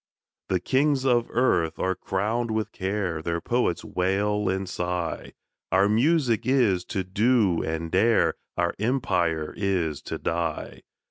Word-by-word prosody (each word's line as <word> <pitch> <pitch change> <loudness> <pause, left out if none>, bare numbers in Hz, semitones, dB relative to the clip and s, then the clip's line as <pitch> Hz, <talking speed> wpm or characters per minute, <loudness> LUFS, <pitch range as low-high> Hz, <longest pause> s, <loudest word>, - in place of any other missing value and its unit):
The 95 - +1
kings 135 +6 +1
of 120 -2 +3
earth 85 -10 +1
are 95 - 0
crowned 110 +6 -2
with 110 -1 -2
care, 95 -4 -2
Their 85 +1 -2
poets 120 -2 0
wail 100 +3 0
and 95 0 -2
sigh; 90 -2 -3 0.4
Our 95 +2 +4
music 120 +1 +2
is 115 -9 +3
to 95 - -2
do 100 -1 +2
and 80 +1 -3
dare, 110 +5 +3 0.2
Our 85 0 +1
empire 90 - 0
is 90 -7 -1
to - - -4
die. 85 -2 -3
95 Hz, 135 wpm, -25 LUFS, 85-115 Hz, 0.4 s, Our